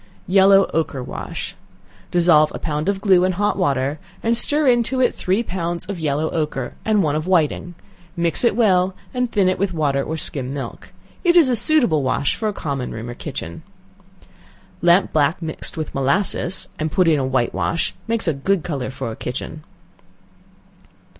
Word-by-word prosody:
Yellow 195 +1 +5
Ochre 150 -5 -1
wash. - - -6 0.5
Dissolve 170 -3 +4
a - - -3
pound 150 +2 -2
of 195 -1 -1
glue 190 -4 +4
in 185 0 +1
hot 205 +3 0
water, 140 -5 0 0.2
and 230 +1 +2
stir 295 +6 +4
into 245 0 +2
it 250 - +3
three 190 +6 0
pounds 175 -4 -4
of 195 -3 -5
yellow 155 0 0
ochre, 150 -5 -3
and 215 -3 +2
one 150 -1 0
of 155 +3 -2
whiting; 175 0 +1 0.4
mix 170 +2 0
it 235 -4 +3
well, 190 -5 +2 0.2
and 250 -2 -1
thin 200 -3 +2
it 185 - 0
with 190 -2 -1
water 140 -3 +1
or 160 +3 -4
skim 135 -3 -3
milk. 130 -4 -7 0.3
It 350 -2 +4
is 325 -7 +6
a 250 - +2
suitable 235 - +2
wash 135 +1 0
for 220 - -2
a - - -1
common 140 -8 -4
room 115 +2 -6
or - - -6
kitchen. 85 -7 -7 1.2
Lamp 175 +2 +4
black 155 +3 +2
mixed 160 -1 -5
with 155 -2 -4
molasses, 175 +6 0
and 155 0 -2
put 185 -1 +2
in 140 -5 +2
white 120 -3 +1
wash, 165 - -1
makes 225 -3 -1
a 165 - +2
good 170 +5 0
color 140 -7 -3
for 130 -3 -5
a - - -7
kitchen. 140 +6 -6
170 Hz, 180 wpm, -20 LUFS, 145-200 Hz, 1.2 s, is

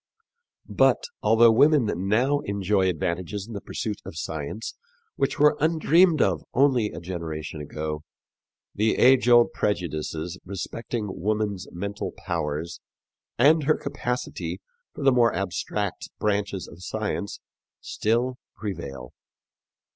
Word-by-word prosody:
But, - - +3 0.2
although 115 +1 +6
women 140 +2 +5 0.2
now 130 +8 +3
enjoy 100 -5 +1
advantages 90 +4 -2
in 115 - -9
the 100 - -5
pursuit 105 -2 -4
of 80 - -9
science 80 +6 -5 0.4
which 135 - 0
were 150 +1 +5
undreamed 160 +1 +4
of 90 -6 +1
only 130 -5 +4
a 85 - -7
generation 80 -3 -5
ago, 75 +1 -4 0.7
the 110 +2 +1
age 130 -1 +5
old 120 -1 +6
prejudices 85 -2 -2
respecting 105 +3 -4
woman's 105 -1 -1
mental 100 +3 -4
powers 75 +3 -3 0.6
and 150 +4 +5
her 155 - +3
capacity 125 0 -4 0.3
for 145 - -7
the 135 - +6
more 120 -2 +3
abstract 100 +1 -3
branches 100 -2 -1
of 80 - -13
science 105 +1 -3 0.4
still 120 +4 0 0.2
prevail. 70 - -6
105 Hz, 115 wpm, -25 LUFS, 85-125 Hz, 0.7 s, although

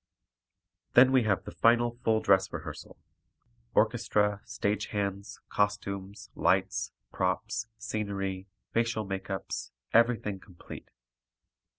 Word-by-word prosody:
Then 125 +2 +8
we 130 -3 +4
have 100 -3 +1
the - - -8
final 120 +1 +3
full 110 -1 +3
dress 95 -1 +3
rehearsal, - - -7 0.8
orchestra, 105 -1 +2
stage 105 +1 -1
hands, 100 -1 -3
costumes, 100 -1 -2
lights, - - +1 0.2
props, 110 +5 -1
scenery, 100 -4 -3 0.3
facial 115 -2 +1
makeups, 95 0 -4 0.2
everything 115 -4 +3
complete. 90 -2 -12
105 Hz, 95 wpm, -29 LUFS, 95-115 Hz, 0.8 s, Then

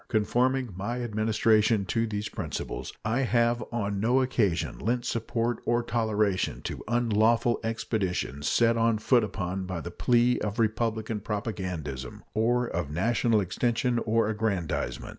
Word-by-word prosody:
Conforming 125 +2 +1
my 120 +6 -3
Administration 110 -1 +2
to 115 +3 0
these 105 -1 -3
principles, - - -5
I 110 +4 +1
have 120 -2 +2
or 105 -4 -2
no 115 +6 +2
occasion 110 -9 0
lent 120 +2 -1
support 115 0 -1
or 120 0 +1
toleration 110 -5 0
to - - -5
unlawful 115 0 +2
expeditions 95 -10 -2
set 115 0 +3
on 115 -1 +3
foot 120 +2 +3
upon 95 -2 -3
the 85 -2 -5
plea 120 +4 +2
of 105 +1 -3
republican 110 -1 0
propagandism 90 - -4
or 120 +3 +2
of 85 -9 -3
national 110 +6 +2
extension 120 +5 0
or 115 -1 +1
aggrandizement. 105 -6 -2
110 Hz, 130 wpm, -28 LUFS, 100-120 Hz, -, set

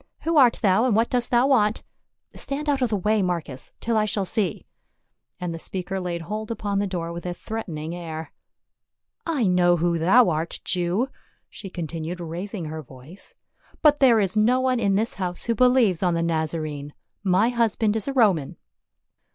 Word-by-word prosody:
Who 330 -1 0
art 250 -4 +6
thou, 200 +4 +4
and 240 -5 +2
what 225 +2 +2
dost 245 -1 0
thou 240 +1 +4
want? 220 -6 +2 0.5
Stand 290 +2 -3
out 280 -2 +1
of 250 - +2
the 210 - 0
way, 210 +3 +1
Marcus, 170 -8 -3
till 230 -1 0
I 215 - +3
shall 205 -2 -1
see," 195 -4 -1 0.7
and 180 -2 -3
the 165 - -6
speaker 190 +2 -3
laid 175 -2 -3
hold 215 +5 -5
upon 205 -3 -2
the 200 - 0
door 170 -3 -4
with 170 - -7
a 175 -1 -4
threatening 170 -9 -5
air. 165 -2 -6 0.5
" - - -23
I 240 - +2
know 175 -1 +3
who 170 0 0
thou 190 +5 +5
art, 160 +2 -3
Jew," 185 +8 0 0.4
she 195 - -9
continued 165 0 -5
raising 175 +2 -5
her 155 +1 -5
voice, 135 +7 -12 0.2
" - - -31
but 295 -1 +5
there 245 -5 +5
is 195 -1 0
no 230 +4 +3
one 255 -1 +1
in 200 -3 +2
this 220 +4 0
house 180 -2 -4
who 235 - 0
believes 245 -7 +3
on 180 -3 +2
the 165 - 0
Nazarene; 155 -3 -3 0.3
my 195 +4 +3
husband 225 -3 +1
is 220 - -3
a 275 - -1
Roman." 195 - +2
190 Hz, 190 wpm, -24 LUFS, 170-230 Hz, 0.7 s, art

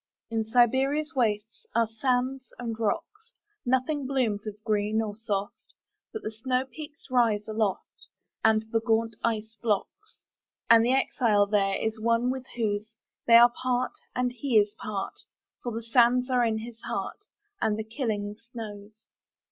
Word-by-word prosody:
In 225 -1 0
Siberia's 265 +6 +3
wastesAre 220 0 0
sands 260 +1 +1
and 230 -2 -4
rocks. 420 - -3 0.3
Nothing 260 +2 +1
blooms 230 -6 0
of 210 - -4
green 215 -1 +1
or 215 -2 -2
soft, 205 -2 -2 0.6
But 440 - -6
the - - -2
snowpeaks 260 +5 -4
rise 225 -4 +3
aloftAnd 220 +1 -2
the 225 - +2
gaunt 225 -1 +1
ice 220 -1 -1
blocks. 235 - -2 0.5
And 230 -1 +8
the 245 +2 +3
exile 230 -6 +3
thereIs 205 +2 0
one 230 +2 +2
with 260 0 -5
those; 215 -1 -2 0.3
They 230 - +8
are 240 +1 +9
part, 255 0 0 0.2
and 250 0 +1
he 245 -1 +1
is 205 0 +3
part, 205 -2 -5 0.4
For 240 - -3
the 230 +1 -4
sands 245 +2 +3
are 250 -1 +3
in 225 -2 +1
his 230 +1 -8
heart, - - -4 0.4
And 210 -1 +1
the 220 - -2
killing 215 -3 -3 0.2
snows. 215 -2 -9
230 Hz, 140 wpm, -27 LUFS, 215-250 Hz, 0.6 s, are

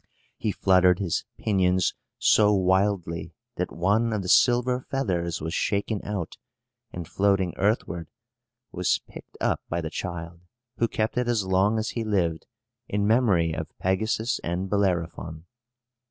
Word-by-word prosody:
He 110 - -1
fluttered 90 -2 +4
his 95 -4 -1
pinions 95 -3 +2 0.2
so 105 -1 +4
wildly 95 -3 +1 0.2
that - - -2
one 105 +7 +1
of 105 -2 -1
the - - -5
silver 125 +3 +4
feathers 90 -12 -1
was 80 +2 -3
shaken 100 +2 -1
out, 100 -5 -4 0.5
and 85 -2 -6
floating 95 -3 +1
earthward, 90 -6 -1 0.6
was 90 0 +1
picked - - -13
up - - 0
by 85 - -1
the 80 -1 -4
child, 85 -2 -5 0.4
who 115 - +2
kept 110 +2 -1
it 125 - -1
as 115 -5 +1
long 95 +4 +2
as 110 0 -1
he 115 - -3
lived, 90 -7 0 0.4
in 100 0 0
memory 100 -8 +3
of 80 -1 -6
Pegasus 110 +5 0
and 90 +3 -3
Bellerophon. 85 -5 -1
95 Hz, 140 wpm, -26 LUFS, 85-105 Hz, 0.6 s, fluttered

